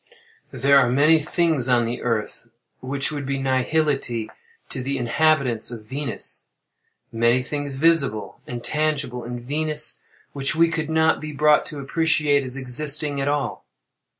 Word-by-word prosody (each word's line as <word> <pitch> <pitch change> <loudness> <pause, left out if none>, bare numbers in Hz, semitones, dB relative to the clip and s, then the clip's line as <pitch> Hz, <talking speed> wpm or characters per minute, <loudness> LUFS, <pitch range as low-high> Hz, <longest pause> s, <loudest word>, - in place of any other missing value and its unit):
There 140 +2 +4
are 125 -3 +3
many 150 +5 +4
things 155 -4 0
on 120 -2 +3
the 120 +2 -4
Earth, 115 -3 -3 0.3
which 135 +2 -1
would 145 -2 -4
be 135 0 -2
nihility 135 -3 0 0.4
to 130 - -4
the 135 +2 -2
inhabitants 130 -2 +1
of 115 -3 -8
Venus—many 120 -2 -3
things 145 0 -5
visible 140 -7 +1
and 120 -1 -6
tangible 150 -5 -1
in 120 +1 -6
Venus, 150 +4 +1 0.3
which 140 +1 0
we 165 +1 +4
could 160 -1 -3
not 160 0 +2
be 155 0 -6
brought 150 +1 +3
to 150 - -7
appreciate 150 0 +1
as 130 0 -6
existing 140 +2 0
at 135 - -1
all. 145 -3 -2
140 Hz, 145 wpm, -23 LUFS, 125-150 Hz, 0.4 s, There